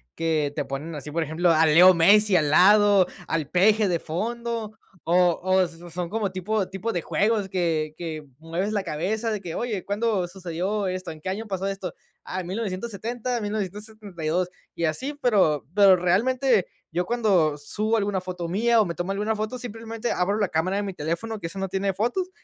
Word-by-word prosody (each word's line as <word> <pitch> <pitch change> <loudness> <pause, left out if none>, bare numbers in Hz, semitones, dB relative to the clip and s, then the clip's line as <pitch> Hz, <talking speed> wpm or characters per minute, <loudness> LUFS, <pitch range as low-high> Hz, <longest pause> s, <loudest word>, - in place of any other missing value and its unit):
que 155 -3 0
te 145 - -1
ponen 140 +4 -5
así, 150 -1 -7
por 165 +2 -1
ejemplo, 160 +3 +1
a 160 -1 +5
Leo 175 +4 +7
Messi 200 +4 +5
al 150 -4 +3
lado, 200 +2 +6 0.2
al 155 -3 -2
Peje 210 +4 +4
de 175 -2 +1
fondo, 225 +5 -4 0.3
o 175 +1 +4
o 185 +1 +3
s 175 -1 -4
son 175 +1 -4
como 210 -1 -1
tipo 190 +2 -2
tipo 210 +4 -3
de 175 - -1
juegos 210 +2 0
que 160 -4 -1
que 160 -3 -5
mueves 165 +6 -3
la 205 -2 0
cabeza 200 +8 -2
de 210 -2 -3
que: 170 -4 -6
"Oye, 220 -6 -3
¿cuándo 205 -2 0
sucedió 185 +3 -3
esto? 185 0 -4
¿En 160 - -11
qué 170 - -5
año 215 +4 -4
pasó 190 -1 -3
esto? 195 -3 -4 0.3
Ah, 185 - -4
en 175 - -8
1970, 225 +4 -3
en 225 - -4
1972". 200 -4 -3 0.3
Y 170 - -4
así, 260 - -2
pero 195 - +2
pero 200 -1 +7
realmente 220 +5 +2 0.2
yo 180 +1 -1
cuando 195 -11 +2
subo 215 +10 -1
alguna 200 -3 -1
foto 180 -2 -5
mía 230 +6 +2
o - - +2
me 170 - -3
tomo 175 +4 -3
alguna 210 +2 -1
foto, 215 +4 -3
simplemente 230 -1 -5
abro 190 +4 0
la 205 -2 +1
cámara 175 +3 0
de 205 - -1
mi 195 -1 -4
teléfono, 180 +8 -3
que 165 - -4
eso 170 - -9
no 195 0 -2
tiene 195 +1 0
fotos, 245 - -1
190 Hz, 195 wpm, -25 LUFS, 170-215 Hz, 0.3 s, Leo